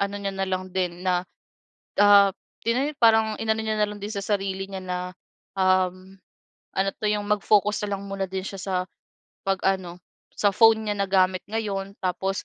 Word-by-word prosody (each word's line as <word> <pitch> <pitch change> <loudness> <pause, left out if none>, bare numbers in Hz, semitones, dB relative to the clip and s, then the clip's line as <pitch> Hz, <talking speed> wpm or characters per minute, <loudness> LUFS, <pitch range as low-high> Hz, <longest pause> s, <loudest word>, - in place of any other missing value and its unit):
ano 200 0 -1
niya 200 -1 -3
nalang 185 -1 -3
din 180 -1 -2
na, 180 -1 +2 0.8
ah, 200 -1 +7 0.3
tina 250 +5 +1
parang 220 -2 +4
inano 220 0 0
niya 220 0 -1
na 210 - +5
lang 210 - -8
din 205 - -5
sa 200 -2 -4
sarili 195 -2 -1
niya 195 -1 -6
na, 180 0 -2 0.6
um, 185 0 +1 0.6
ano 190 +1 +2
'to - - -9
yung 210 -1 -1
mag-focus 210 0 +2
na 200 -1 -2
lang 195 - -9
muna 195 0 -2
din 190 0 -3
siya 195 - -6
sa 190 0 -3 0.7
pag-ano 190 -2 -1 0.4
sa 205 - +2
phone 220 -1 +5
niya 205 - -1
na 200 - +1
gamit 185 -1 +3
ngayon. 200 -3 -3
Tapos 190 +1 -2
195 Hz, 175 wpm, -25 LUFS, 190-210 Hz, 0.8 s, ah